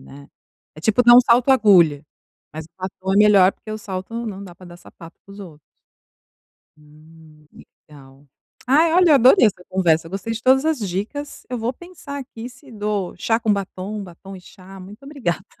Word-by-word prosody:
né. 140 +1 -15 0.5
É 155 - -13
tipo 220 +7 +1
usar 240 0 +7
um 250 - +9
salto 240 +2 +2
agulha, 180 - +4 0.5
mas 155 0 -8
o - - -31
batom 190 0 -5
é - - +1
melhor 200 -3 +5
porque 215 - -14
o 215 - -5
salto 190 +2 -7
não 200 -2 -7
dá 175 -3 -12
para 185 - -16
dar 175 0 -13
sapato 165 -1 -16
para 195 - -15
os 205 - -12
outros. 160 -6 -12 1.2
Hum, 155 0 -20
que - - -17 0.2
legal. 140 -1 -18 0.4
Ai 315 +5 +3
olha 360 -2 +4
eu - - +7
adorei 255 - +5
essa 180 -3 -1
conversa, 165 -3 0
gostei 195 +4 -5
de 225 - -7
todas 265 +3 +3
as 315 -5 0
dicas, 210 +10 -6
eu 250 - -4
vou 230 +2 -2
pensar 320 -2 -11
aqui 245 -2 -9
se 250 +1 -18
dou 210 -3 -4
chá 225 +5 0
com 220 -3 +1
batom, 200 +1 -6
batom 190 +2 -12
e 185 - -13
chá, 190 +1 -15
muito 205 +7 -13
obrigada. 240 - -4
200 Hz, 195 wpm, -20 LUFS, 175-240 Hz, 1.2 s, um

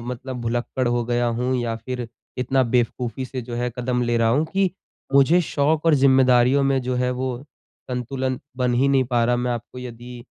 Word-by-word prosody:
मतलब 125 +1 -6
भुलक्कड़ 120 +2 -2
हो 120 0 0
गया 120 0 0
हूँ 125 +2 0
या 120 -2 -1
फ़िर 125 0 -5 0.3
इतना 130 +1 +2
बेवकूफ़ी 120 0 -1
से 130 0 -5
जो 120 0 -7
है 120 +1 -1
कदम 125 0 0
ले 120 0 +1
रहा 115 -1 +3
हूँ 145 +7 +2
कि 195 -1 +2 0.4
मुझे 145 +6 +5
शौक़ 155 0 0
और 160 - +6
ज़िम्मेदारियों 130 -1 +4
में 135 -1 +2
जो 125 0 -2
है 125 0 +1
वो 125 0 -2 0.5
संतुलन 130 +1 -2 0.2
बन 125 -1 +1
ही 135 +3 +3
नहीं 135 -1 +3
पा 120 -1 +1
रहा 120 +1 +2
मैं 125 0 -1
आपको 120 +1 -7
यदि 120 0 -9
125 Hz, 195 wpm, -22 LUFS, 120-130 Hz, 0.5 s, और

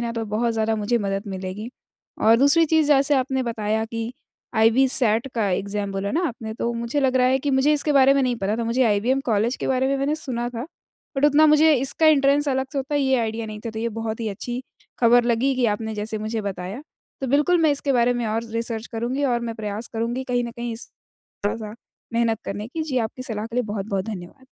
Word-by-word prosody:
ना, 235 -1 -2
तो 230 -1 -3
बहुत 220 +3 0
ज़्यादा 220 0 0
मुझे 215 +3 0
मदद 195 -1 -2
मिलेगी। 190 +3 -5 0.5
और 225 +1 +6
दूसरी 285 +6 +5
चीज़ 315 -1 +3
जैसे 285 0 +4
आपने 265 0 0
बताया 220 -2 -1
कि 230 +1 -5 0.4
आईबीसैट 230 0 +4
का 220 -4 +1
एग्ज़ाम 200 +2 -2
बोला 195 +1 -2
ना 325 - +1
आपने, 220 -3 -7
तो 235 +1 -2
मुझे 235 +4 -2
लग 260 -1 +2
रहा 250 0 +4
है 260 +1 +3
कि 285 +2 -2
मुझे 270 +3 +3
इसके 300 0 +1
बारे 275 -1 +6
में 275 - +2
नहीं 250 -2 0
पता 205 +1 -1
था, 235 - -2
मुझे 235 +3 +1
आईबीएम 230 +5 +2
कॉलेज 225 +2 +1
के - - -4
बारे 260 0 +1
में 275 - +1
मैंने 275 +2 0
सुना 240 -6 -3
था। 240 +2 -6 0.5
बट 270 - +2
उतना 295 +1 +6
मुझे 305 +1 +6
इसका 270 +5 +1
एंट्रेंस 285 -1 +4
अलग 265 0 0
से 285 - -2
होता 275 +2 -3
है, 290 - +2
ये 265 -1 +2
आइडिया 225 0 -3
नहीं 215 -1 -7
था, - - -3
तो 220 - -7
ये 230 +1 -1
बहुत 225 0 -4
ही 225 - -2
अच्छी 240 +5 -5 0.4
खबर 240 0 +5
लगी 240 +3 +1
कि 250 -2 +2
आपने 220 0 -5
जैसे 215 +1 -3
मुझे 220 +1 -3
बताया। 195 +4 -5 0.4
तो 270 - -2
बिल्कुल, 295 +7 +3
मैं 315 - +4
इसके 285 -1 0
बारे 245 -1 +3
में 240 -1 -2
और 220 +2 -1
रिसर्च 230 0 -3
करूँगी 245 +5 -2
और 240 -3 +1
मैं 230 -1 -4
प्रयास 215 +1 -5
करूँगी 235 +3 -2
कहीं 245 -1 +1
न 235 - -5
कहीं 235 0 -5
इस 225 - -6 0.6
थोड़ा-सा 215 0 -3 0.4
मेहनत 230 -2 +1
करने 205 +2 -4
की। 315 +6 -4
जी, 285 -5 -2
आपकी 230 +2 -2
सलाह 220 -4 -4
के 230 +1 -8
लिए 250 - +2
बहुत-बहुत 195 -2 -2
धन्यवाद। 210 +5 -8
235 Hz, 230 wpm, -23 LUFS, 220-265 Hz, 0.6 s, और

